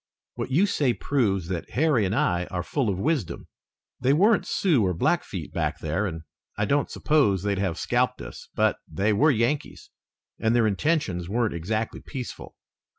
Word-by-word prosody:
What - - -4
you 160 +10 +3
say 140 -10 +1
proves 100 -11 0
that 90 -3 -4
Harry 130 -5 +2
and 95 - -1
I 90 -3 +1
are 90 -1 -3
full 130 +3 -1
of 95 - -1
wisdom. 110 - -1 0.5
They 130 +2 +3
weren't 205 +8 +3
Sioux 155 - +2
or 90 -2 0
Blackfeet - - -1
back - - -1
there 105 +3 -1
and 80 -3 -6 0.3
I 105 - +1
don't 140 +5 +1
suppose 105 - +2
they'd 100 -2 0
have 95 -4 -1
scalped - - 0
us, - - -9
but - - +2
they 100 +7 +1
were 145 +10 +4
Yankees 130 +3 -1 0.5
and 110 +1 +2
their 120 -2 +4
intentions 100 - 0
weren't 115 +1 0
exactly 110 +7 -3
peaceful. 130 -4 -7
110 Hz, 170 wpm, -25 LUFS, 95-140 Hz, 0.5 s, were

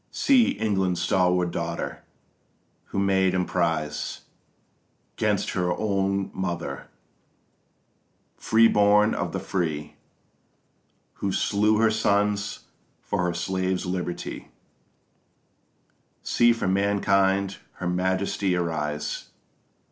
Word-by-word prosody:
_ - - -45
See 260 -5 +3
England's 95 -4 0
stalwart 90 0 +2
daughter, 85 0 -4 0.8
who - - -7
made 95 -1 +2
emprise 85 -4 -1 0.9
'Gainst - - 0
her 90 -1 0
own 100 -2 0
mother, 85 -7 -4 1.5
freeborn 105 -1 +4
of 85 -1 -2
the - - -3
free, 80 -6 -3 1.2
Who 100 - 0
slew 105 +3 +2
her 110 0 +3
sons 105 -1 0 0.4
for 90 - -2
her 85 -1 -1
slaves' 95 +1 -1
liberty, 90 -1 -4 1.8
See 120 0 +4
for 115 -4 -1
mankind 100 0 +2 0.2
her 90 - -5
majesty 95 +1 0
arise! 75 -3 -2
95 Hz, 90 wpm, -25 LUFS, 90-100 Hz, 1.8 s, freeborn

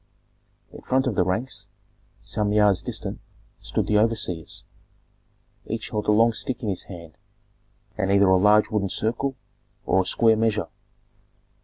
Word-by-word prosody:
In - - -11
front 130 +1 +1
of 130 - 0
the 90 - +2
ranks, 110 +9 -3 0.6
some 105 -1 -1
yards 105 -2 +3
distant, - - -5 0.4
stood - - -2
the 105 -1 +2
overseers; 105 -7 -1 1.0
each 115 0 -5
held 105 -1 -3
a - - +4
long 115 +2 +4
stick 125 +2 -3
in 110 - -1
his 95 - -3
hand, 85 -4 -11 0.8
and 95 -1 +1
either 100 0 +5
a 95 0 +5
large 105 +3 +4
wooden 100 -3 0
circle 120 +7 -1 0.5
or 95 - +3
a - - -4
square 115 +3 +4
measure. 110 -4 0
105 Hz, 150 wpm, -24 LUFS, 95-115 Hz, 1.0 s, either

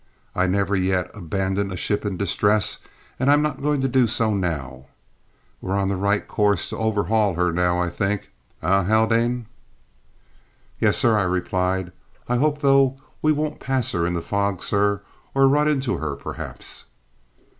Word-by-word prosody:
"I 90 +1 +1
never 100 +1 +1
yet 95 -1 0
abandoned 95 +1 -2
a 90 - -4
ship 105 +4 -1
in 95 -3 -3
distress, 100 +2 +1 0.4
and 130 +2 +2
I'm 145 +1 +5
not 150 -3 -2
going 145 -1 +1
to 135 - +1
do 130 -1 +3
so 110 -1 +1
now. 70 -9 -3 0.7
We're 95 - -2
on 100 -1 0
the 100 - 0
right 100 +2 0
course 105 -4 +1
to - - -5
overhaul 110 -2 +1
her, 90 0 +1
now, 90 0 +1
I 90 0 0
think, 105 -1 -2 0.3
eh, 95 +4 +3
Haldane?" 115 +3 +2 1.3
"Yes, - - +3
sir," 115 -2 +3
I - - +2
replied. 90 0 -1 0.4
"I 125 - +1
hope, 150 +2 +1
though, 135 -1 +4 0.2
we 155 - +3
won't 150 0 -2
pass 130 -3 -1
her 85 0 0
in 90 - -1
the 85 - -3
fog, 100 -2 -1
sir, 100 0 +1 0.3
or 135 0 +5
run 150 +2 +3
into 135 -4 0
her, 75 -3 -3
perhaps." - - -7
100 Hz, 165 wpm, -23 LUFS, 90-125 Hz, 1.3 s, I'm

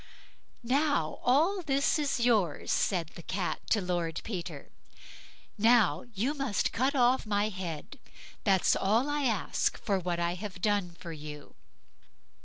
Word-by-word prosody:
"Now 270 - +1
all 325 +10 +3
this 280 0 +1
is 285 -4 0
yours", 215 -10 +1
said 175 -5 +1
the 170 - -11
Cat 185 +2 -2
to 220 - +3
Lord 175 -3 -2
Peter. 185 -6 -6 0.9
"Now, 215 -7 +4
you 240 +9 0
must 275 -7 -1
cut 265 +4 +1
off 250 -2 +3
my 205 0 +1
head; 180 -6 -6 0.4
that's 195 -3 +3
all 220 +7 +2
I 290 -1 -1
ask 220 -7 0
for 200 -3 -1
what 175 -1 -2
I 170 0 0
have 185 0 -7
done 205 -2 +1
for 170 - -7
you." 150 -1 -9
205 Hz, 140 wpm, -30 LUFS, 175-255 Hz, 0.9 s, Now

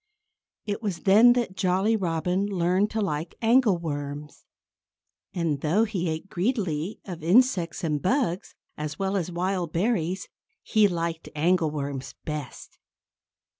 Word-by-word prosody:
It 205 +1 -3
was 195 -6 -3
then 220 +5 +7
that 240 -6 -2
Jolly 190 +4 +2
Robin 180 0 0
learned 185 +1 +1
to 220 - -2
like 160 -4 -3
angleworms. 165 - 0 0.9
And 160 -5 -1
though 175 +9 +2
he 190 -6 -2
ate 160 +4 -4
greedily 185 - -2
of 175 -4 -7
insects 180 - +2
and 150 -3 0
bugs, 210 -5 0 0.2
as 150 -1 -5
well 195 0 -1
as 180 -2 -1
wild 180 -1 -1
berries, 185 -1 0 0.4
he 215 -1 +4
liked 170 -3 -3
angleworms 150 -5 0
best. 150 -4 -7
180 Hz, 125 wpm, -26 LUFS, 160-205 Hz, 0.9 s, then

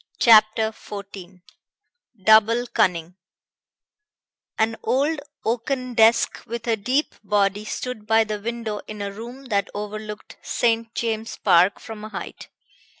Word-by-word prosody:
CHAPTER 220 -1 +5
XIV 195 -4 -10 0.8
DOUBLE 220 +3 +5
CUNNING 180 -5 +1 1.4
An 225 +1 +1
old 290 +4 +1 0.3
oaken 250 +2 -2
desk 225 0 +4
with 235 0 -5
a 230 -2 +2
deep 255 +8 -1
body 205 0 +1
stood 220 -1 -5
by 225 0 +4
the 215 -1 -4
window 230 -2 -4
in 210 -1 -6
a 200 - -4
room 240 +6 -9
that 200 -2 0
overlooked 210 +1 -7
St. 230 -1 0
James's 225 -1 -3
Park 180 +3 +4
from 220 -1 -9
a 215 - -7
height. - - -8
220 Hz, 125 wpm, -23 LUFS, 205-230 Hz, 1.4 s, CHAPTER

